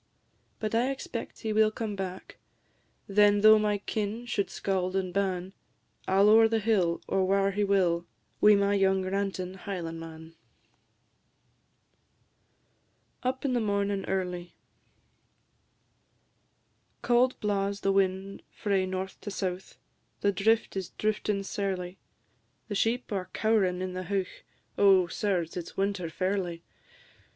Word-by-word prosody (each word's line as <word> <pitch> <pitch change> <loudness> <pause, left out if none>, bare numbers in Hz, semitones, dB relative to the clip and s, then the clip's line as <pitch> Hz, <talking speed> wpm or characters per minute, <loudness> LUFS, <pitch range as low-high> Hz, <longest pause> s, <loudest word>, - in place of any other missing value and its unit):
But 215 0 -3
I 240 +3 +2
expect 260 -3 -6
he 220 -1 -2
will 215 0 +4
come 215 -1 -4
back; 190 -1 -6 0.7
Then, 205 0 +4
though 215 0 +8
my 210 -1 +1
kin 215 +3 -3
should 205 -4 -1
scauld 185 -1 -2
and 185 -2 -1
ban, 190 -1 -1 0.5
I 190 - +1
'll 205 - +6
ower 225 +1 +7
the 225 0 +1
hill, 200 -6 +1
or 190 - +1
whare 195 +1 +2
he 205 +1 0
will, 180 -4 +1 0.3
Wi' 210 0 +7
my 200 0 +2
young 190 -1 +2
rantin' 190 -1 -2
Highlandman. 165 -3 -7 2.9
UP 260 +2 -2
IN 265 - +1
THE 245 - +2
MORNIN' 200 -2 0
EARLY. 180 -2 -3 2.5
Cauld 250 +1 +3
blaws 200 -1 -1
the 195 - +2
wind 195 0 0
frae 195 -3 -1
north 185 0 -5
to - - -6
south; 190 -2 -4 0.4
The 200 - +3
drift 220 +4 +1
is 190 -3 -3
drifting 210 -1 -1
sairly; 190 -2 -3 0.7
The - - -3
sheep 230 +5 0
are 190 -3 -3
cow'rin' 195 -5 +1
in 185 -1 -4
the 185 0 -5
heuch; 195 0 -3 0.4
Oh, 195 -2 +6
sirs, 175 -2 -2
it 175 -2 -4
's - - -13
winter 195 -3 -1
fairly! 185 -1 -2
195 Hz, 130 wpm, -28 LUFS, 185-210 Hz, 2.9 s, though